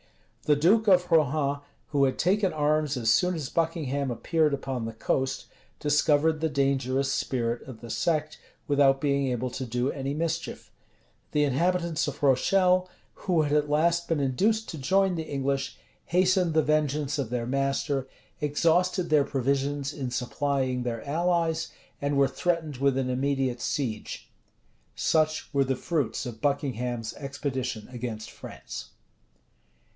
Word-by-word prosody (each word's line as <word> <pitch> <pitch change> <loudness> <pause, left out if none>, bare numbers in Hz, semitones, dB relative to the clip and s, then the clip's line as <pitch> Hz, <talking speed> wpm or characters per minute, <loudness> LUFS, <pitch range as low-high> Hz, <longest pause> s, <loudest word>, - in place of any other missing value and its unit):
The 150 - +4
duke 200 +9 +3
of 180 -1 +4
Rohan, 145 -2 +2 0.3
who 140 -2 +2
had 130 - 0
taken 190 +2 +2
arms 150 -2 +1
as 115 -2 +2
soon 180 +9 +3
as 150 -5 -4
Buckingham 150 -5 -1
appeared 155 +5 +1
upon 130 -3 -4
the 115 - -3
coast, 130 +4 -1 0.3
discovered 150 +1 +2
the 160 - +1
dangerous 135 -1 +1
spirit 120 -2 -1
of 125 -4 -9
the 120 -1 -7
sect, 155 -2 -1 0.3
without 140 -2 +4
being 140 -1 +1
able 125 0 -2
to 130 - -4
do 125 +3 -1
any 135 0 -3
mischief; 165 +1 -3 0.6
the 150 - +3
inhabitants 170 +4 +1
of 145 0 -6
Rochelle, 180 +7 +3 0.2
who 175 -5 +1
had 145 -1 -1
at 150 -1 +2
last 170 +3 +2
been 165 -3 0
induced 200 - +1
to 160 - -6
join 190 +6 +2
the 160 - -3
English, 140 -1 -2 0.3
hastened 180 -2 +2
the 155 - +4
vengeance 150 -1 0
of 130 -5 -2
their 120 -1 -2
master, 135 +1 -1 0.3
exhausted 170 +4 +1
their 150 -2 +5
provisions 140 +1 -1
in 135 -4 -4
supplying 130 +1 -1
their 120 +1 -4
allies, 165 +1 0 0.3
and 140 0 0
were 140 -1 +5
threatened 160 0 -1
with 140 0 +2
an 130 -1 0
immediate 130 -1 0
siege. 115 -7 -3 0.7
Such 155 -1 +1
were 140 -1 +3
the 135 0 0
fruits 145 -7 -1
of 115 -3 -7
Buckingham's 125 -5 -1
expedition 130 -5 -4
against 120 -3 -6
France. - - -9
140 Hz, 145 wpm, -27 LUFS, 130-160 Hz, 0.7 s, their